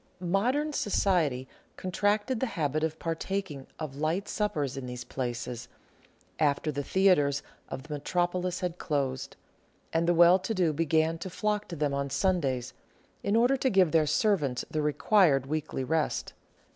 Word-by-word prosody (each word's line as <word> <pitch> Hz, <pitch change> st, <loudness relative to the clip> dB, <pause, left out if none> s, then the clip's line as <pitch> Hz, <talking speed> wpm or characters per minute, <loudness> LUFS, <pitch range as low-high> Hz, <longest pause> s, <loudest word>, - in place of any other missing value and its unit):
Modern 265 Hz, +10 st, +1 dB
society 165 Hz, -, +1 dB, 0.3 s
contracted 205 Hz, +6 st, 0 dB
the 260 Hz, -, 0 dB
habit 155 Hz, 0 st, 0 dB
of 160 Hz, 0 st, -1 dB
partaking 165 Hz, -3 st, -3 dB
of 150 Hz, -4 st, -6 dB
light 160 Hz, +6 st, -1 dB
suppers 155 Hz, -11 st, -1 dB
in 135 Hz, -2 st, -5 dB
these 125 Hz, 0 st, -6 dB
places, 120 Hz, -2 st, -4 dB, 0.7 s
after 150 Hz, 0 st, +1 dB
the 145 Hz, 0 st, -3 dB
theatres 145 Hz, -5 st, +3 dB, 0.3 s
of 130 Hz, -, -6 dB
the 150 Hz, +1 st, -7 dB
Metropolis 180 Hz, +4 st, -1 dB
had 180 Hz, -1 st, -3 dB
closed; 135 Hz, -4 st, -2 dB, 0.6 s
and 165 Hz, +1 st, +1 dB
the 175 Hz, -, +3 dB
well 175 Hz, +2 st, +7 dB
to 190 Hz, +4 st, -3 dB
do 175 Hz, -5 st, +2 dB
began 160 Hz, +1 st, +1 dB
to 190 Hz, -, -5 dB
flock 210 Hz, +3 st, -1 dB
to 170 Hz, -, -6 dB
them 145 Hz, -2 st, 0 dB
on 140 Hz, 0 st, -1 dB
Sundays, 140 Hz, -6 st, 0 dB, 0.5 s
in 200 Hz, -, 0 dB
order 245 Hz, +4 st, +4 dB
to 260 Hz, -, +1 dB
give 190 Hz, -6 st, +4 dB
their 160 Hz, -2 st, +3 dB
servants 150 Hz, -, +1 dB
the 155 Hz, -, 0 dB
required 150 Hz, -2 st, +3 dB
weekly 150 Hz, -2 st, -3 dB
rest. 160 Hz, +3 st, -1 dB
160 Hz, 155 wpm, -29 LUFS, 140-190 Hz, 0.7 s, well